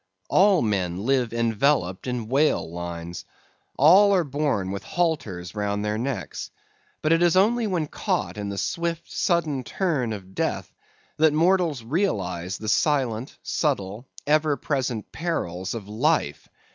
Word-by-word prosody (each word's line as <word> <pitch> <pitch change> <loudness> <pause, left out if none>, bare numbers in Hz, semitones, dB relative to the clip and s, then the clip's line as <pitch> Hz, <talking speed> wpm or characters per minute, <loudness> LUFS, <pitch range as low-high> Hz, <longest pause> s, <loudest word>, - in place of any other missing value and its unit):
All 195 -4 +5
men 95 -3 -1
live 130 -3 +2
enveloped 115 -3 +1
in 125 -3 -3
whale 140 - +2
lines. 85 +1 -6 0.5
All 195 +8 +7
are 180 - +3
born 140 -10 -1
with 100 +1 -4
halters 125 - -2
round 105 0 -2
their 105 +1 -1
necks; 130 +1 -4 0.5
but 155 +1 +4
it 165 - +3
is 175 -1 +4
only 225 +4 +3
when 175 -6 0
caught 95 -10 -2
in 105 -1 -4
the 100 - -5
swift, 170 - -2
sudden 160 -7 0
turn 140 - -1
of 95 -3 -7
death, - - -2 0.4
that 155 -1 +4
mortals 165 -5 +2
realize 95 - -1
the 110 - -7
silent, 130 -1 +1
subtle, 115 - -2 0.2
ever 150 -1 +2
present 130 -6 -2
perils 95 - -3
of 105 -4 -7
life. 115 - 0
130 Hz, 140 wpm, -25 LUFS, 100-160 Hz, 0.5 s, All